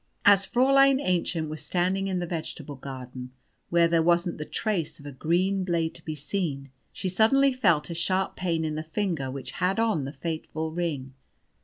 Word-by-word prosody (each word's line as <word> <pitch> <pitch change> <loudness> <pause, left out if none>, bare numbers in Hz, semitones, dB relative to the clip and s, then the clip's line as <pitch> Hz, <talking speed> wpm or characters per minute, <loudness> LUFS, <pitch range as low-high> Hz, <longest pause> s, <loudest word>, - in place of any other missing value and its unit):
As 200 -1 +6
Fräulein 275 +2 +5
Aennchen 175 - 0
was 155 0 -5
standing 185 +2 0
in 190 -1 -1
the 175 - -1
vegetable 160 -3 -5
garden, 130 -2 -8 0.4
where 170 -1 +4
there 165 0 +3
wasn't 170 0 +2
the 150 - -4
trace 180 -8 -2
of 145 - -14
a 145 - -6
green 180 +8 +1
blade 170 -2 0
to 170 -1 -12
be 155 - -4
seen, 145 -3 -3 0.2
she 190 - -3
suddenly 240 +9 +4
felt 170 -11 +2
a - - -2
sharp 185 +3 0
pain 165 -3 -1
in 155 - -2
the 155 - -3
finger 160 -4 -2
which 130 0 -6
had 185 +4 0
on 220 -11 +1
the 135 - -5
fateful 160 +2 -4
ring. 155 -6 -3
170 Hz, 185 wpm, -27 LUFS, 155-190 Hz, 0.4 s, As